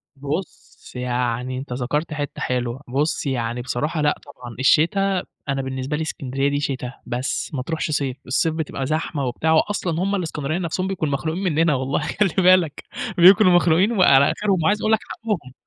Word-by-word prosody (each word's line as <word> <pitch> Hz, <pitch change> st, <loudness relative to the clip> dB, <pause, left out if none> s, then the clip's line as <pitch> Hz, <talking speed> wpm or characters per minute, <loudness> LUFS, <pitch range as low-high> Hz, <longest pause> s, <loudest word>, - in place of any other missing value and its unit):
بُصّ، 145 Hz, +6 st, -6 dB
يعني 125 Hz, 0 st, -2 dB
أنت 130 Hz, -1 st, -6 dB
ذكَرت 145 Hz, +6 st, -2 dB
حِتّة 145 Hz, -2 st, -5 dB
حلوة، 125 Hz, +1 st, -2 dB
بُصّ 140 Hz, +7 st, -1 dB
يعني 120 Hz, -3 st, -2 dB
بصراحة 145 Hz, +6 st, -2 dB
لأ 150 Hz, 0 st, +1 dB
طبعًا 120 Hz, -2 st, -11 dB
الشتا، 180 Hz, +7 st, +3 dB, 0.3 s
أنا 135 Hz, 0 st, 0 dB
بالنسبة 130 Hz, +2 st, -3 dB
لي -, -, -3 dB
إسكندرية 135 Hz, -3 st, -2 dB
دي 145 Hz, 0 st, -1 dB
شتا 135 Hz, -3 st, -3 dB
بس، 125 Hz, +4 st, -3 dB
ما 135 Hz, -, -2 dB
ترُوحش 155 Hz, +3 st, -3 dB
صيف، 140 Hz, -3 st, -1 dB
الصيف 155 Hz, +5 st, +1 dB
بتبقى 155 Hz, -4 st, -3 dB
زحمة 155 Hz, -1 st, -2 dB
وبتاع 130 Hz, +6 st, 0 dB
وأصلًا 170 Hz, 0 st, +1 dB
هُم 200 Hz, +1 st, 0 dB
الإسكندرانية 160 Hz, -3 st, -2 dB
نَفسهم 185 Hz, +1 st, -2 dB
بيكونوا 160 Hz, -7 st, -2 dB
مخنوقين 160 Hz, +6 st, -2 dB
منّنا 165 Hz, -3 st, +2 dB
والله، 130 Hz, +1 st, -1 dB
خلِّ 200 Hz, +7 st, +1 dB
بالك 180 Hz, -5 st, +4 dB, 0.3 s
بيكونوا 185 Hz, +1 st, +7 dB
مخنوقين 175 Hz, +4 st, +4 dB
وعلى 140 Hz, -10 st, +5 dB
آخِرهم 195 Hz, -5 st, 0 dB
وعايز 205 Hz, +6 st, +2 dB
أقول 215 Hz, -, +1 dB
لك 220 Hz, -, +4 dB
حقّهم، 195 Hz, -, -4 dB
150 Hz, 170 wpm, -22 LUFS, 130-175 Hz, 0.3 s, بيكونوا